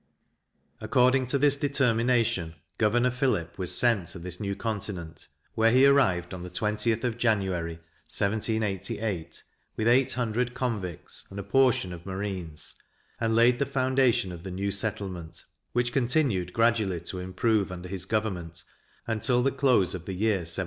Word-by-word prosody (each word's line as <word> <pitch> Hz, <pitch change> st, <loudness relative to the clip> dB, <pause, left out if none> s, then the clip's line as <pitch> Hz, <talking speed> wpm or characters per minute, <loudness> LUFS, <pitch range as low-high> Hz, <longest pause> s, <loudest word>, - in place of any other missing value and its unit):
According 130 Hz, 0 st, +3 dB
to 140 Hz, -, +1 dB
this 145 Hz, 0 st, +4 dB
determination, 120 Hz, -, +1 dB, 0.2 s
Governor 120 Hz, +3 st, +3 dB
Phillip 120 Hz, -, -1 dB
was 90 Hz, -2 st, -2 dB
sent 115 Hz, -8 st, +2 dB
to -, -, -7 dB
this 90 Hz, +1 st, -6 dB
new 100 Hz, -2 st, -2 dB
continent, 95 Hz, -8 st, -5 dB, 0.3 s
where 110 Hz, 0 st, +4 dB
he 130 Hz, +3 st, +6 dB
arrived 95 Hz, -, +3 dB
on 90 Hz, -, -6 dB
the 90 Hz, -, -7 dB
20th 105 Hz, +4 st, -1 dB
of 120 Hz, -2 st, -2 dB
January, 95 Hz, -8 st, 0 dB, 0.3 s
1788, 100 Hz, -3 st, -2 dB, 0.3 s
with 110 Hz, -, 0 dB
eight 125 Hz, +2 st, +4 dB
hundred 120 Hz, +1 st, -1 dB
convicts, 105 Hz, -, -4 dB
and 100 Hz, -, -10 dB
a 100 Hz, -, -3 dB
portion 110 Hz, -4 st, +2 dB
of 85 Hz, +2 st, -10 dB
marines, 95 Hz, -5 st, -4 dB, 0.5 s
and 115 Hz, -1 st, +1 dB
laid 120 Hz, +1 st, +5 dB
the 140 Hz, -, +2 dB
foundation 130 Hz, -7 st, +2 dB
of 85 Hz, -1 st, -8 dB
the 95 Hz, -, -7 dB
new 100 Hz, +2 st, -2 dB
settlement, 95 Hz, -5 st, -4 dB, 0.3 s
which 120 Hz, 0 st, 0 dB
continued 120 Hz, -, +1 dB
gradually 110 Hz, -5 st, +1 dB
to 90 Hz, +2 st, -5 dB
improve 100 Hz, +2 st, 0 dB
under 90 Hz, 0 st, -7 dB
his 95 Hz, -1 st, -4 dB
government, 95 Hz, -7 st, -3 dB, 0.4 s
until 120 Hz, +2 st, +1 dB
the 135 Hz, -, +2 dB
close 130 Hz, -10 st, +3 dB
of 90 Hz, -2 st, -6 dB
the 95 Hz, -, -3 dB
year 105 Hz, +1 st, +2 dB
1792. 85 Hz, -2 st, -1 dB
110 Hz, 155 wpm, -27 LUFS, 90-120 Hz, 0.5 s, he